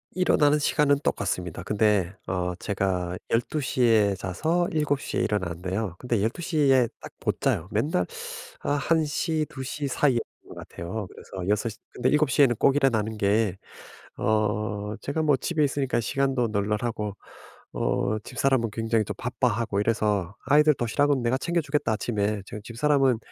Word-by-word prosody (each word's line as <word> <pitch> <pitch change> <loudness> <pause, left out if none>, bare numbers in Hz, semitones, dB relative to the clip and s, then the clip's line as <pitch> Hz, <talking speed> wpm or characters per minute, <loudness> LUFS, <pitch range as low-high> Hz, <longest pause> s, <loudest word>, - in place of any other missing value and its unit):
일어나는 150 -5 +4
시간은 145 -1 +3
똑같습니다. 90 -4 -2
근데 105 -4 +2 0.2
어 90 -1 -1
제가 90 -2 -2
12:00 130 +3 -1
에 110 -4 +4
자서 160 - 0
7:00 150 -3 -1
에 - - +2
일어나는데요. 95 0 -2
근데 120 -4 0
12:00 160 +8 -2
에 130 -2 +5
딱 - - -10
못 - - -1
자요. 85 - +1
맨날 110 - +1 0.6
어 - - -2
1:00 155 +1 +1
2:00 140 +2 -4
사이였던 130 -2 +2 0.3
것 - - -10
같아요. 95 +5 -6
그래서 95 -1 -8
6:00 105 +1 0 0.2
근데 - - +1
7:00 150 -2 +3
에는 125 -4 +5
꼭 135 +4 +4
일어나는 110 -6 +1
게 100 -1 +1 0.6
어 105 -1 0
제가 150 +3 -2
뭐 150 -3 +4
집에 155 +3 0
있으니깐 135 -3 0
시간도 135 -1 0
널널하고 105 0 -1 0.6
어 100 - 0
집사람은 130 +1 0
굉장히 115 0 0
좀 105 - -4
바빠하고 115 -4 0
이래서 105 -4 0
"아이들 150 +2 +5
도시락은 135 +3 +1
내가 120 +2 +1
챙겨주겠다 150 -7 0
아침에." 105 -2 -1
제가 105 - -7
집사람은 135 +1 +2
115 Hz, 295 characters per minute, -26 LUFS, 105-140 Hz, 0.6 s, 에